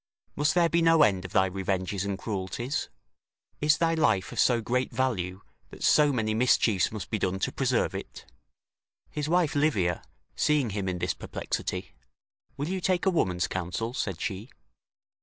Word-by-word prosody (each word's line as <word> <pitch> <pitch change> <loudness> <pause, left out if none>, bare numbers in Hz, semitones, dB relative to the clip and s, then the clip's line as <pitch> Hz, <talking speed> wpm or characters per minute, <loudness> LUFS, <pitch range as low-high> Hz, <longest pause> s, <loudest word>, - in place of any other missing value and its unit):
must 150 +2 +1
there 175 -1 +5
be 170 +1 +1
no 165 -2 +5
end 95 -6 +2
of 90 - -7
thy 95 - +4
revenges 95 0 -2
and 100 -1 -2
cruelties? 110 +7 -3 0.7
Is 150 +1 +3
thy 165 -1 +2
life 100 -12 +1
of - - -5
so 120 -2 +4
great 125 +3 -1
value, 95 -8 -1 0.3
that - - -10
so 150 -1 +5
many 110 -4 0
mischiefs 110 -4 +3
must 110 -2 -7
be 110 - 0
done 95 0 0
to 95 - -1
preserve - - 0
it?" - - -8 0.9
His 150 0 -3
wife 175 -3 +2
Livia, 105 - +1 0.3
seeing 145 -7 +2
him 100 -1 -2
in 90 - -2
this - - -1
perplexity: 60 - -4 0.6
"Will 145 +2 -2
you 185 +1 -2
take 185 0 +1
a 190 - +4
woman's 90 - +1
counsel?" 95 +6 -3
said 95 -9 -3
she. 105 +4 -4
110 Hz, 170 wpm, -28 LUFS, 95-150 Hz, 0.9 s, there